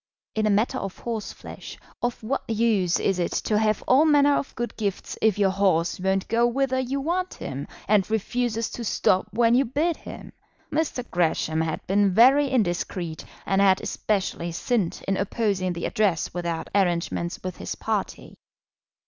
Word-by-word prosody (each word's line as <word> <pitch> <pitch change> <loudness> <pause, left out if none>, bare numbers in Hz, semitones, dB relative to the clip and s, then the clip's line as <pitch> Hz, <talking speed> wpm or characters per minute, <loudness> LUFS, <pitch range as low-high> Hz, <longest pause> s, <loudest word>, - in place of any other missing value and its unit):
In 215 -1 +1
a - - +2
matter 220 +6 +1
of 195 -1 -6
horseflesh 230 -3 -7 0.2
of 240 -1 -2
what 260 +3 -3
use 215 -6 +2
is 195 -2 0
it 175 - -1
to 210 -1 +1
have 215 -1 +1
all 265 +4 +6
manner 290 -2 +5
of - - -3
good 240 -2 -4
gifts 200 -3 -3
if 220 -3 +3
your 195 -2 +3
horse 185 -4 +1
won't 190 +1 0
go 235 +1 +3
whither 260 +1 0
you 260 +2 -2
want 355 +6 -2
him, 135 +1 -6 0.2
and 205 -2 +3
refuses 230 +1 -1
to 240 - -6
stop 190 -3 +1
when 230 +2 +3
you 255 +3 +5
bid 300 +7 0
him? - - -10 0.4
Mr. 290 -5 -1
Gresham 160 -2 +1
had 160 -1 -3
been 195 -1 +2
very 270 +5 +6
indiscreet, 175 -7 -1 0.2
and 195 0 +2
had 190 -1 +5
especially 190 -4 -2
sinned 205 -1 -1
in 195 0 +1
opposing 195 -2 0
the 170 - -4
Address 200 -6 0
without 170 -2 -3
arrangements 175 -2 0
with 185 -1 -5
his - - -5
party. - - -3
210 Hz, 165 wpm, -25 LUFS, 185-240 Hz, 0.4 s, all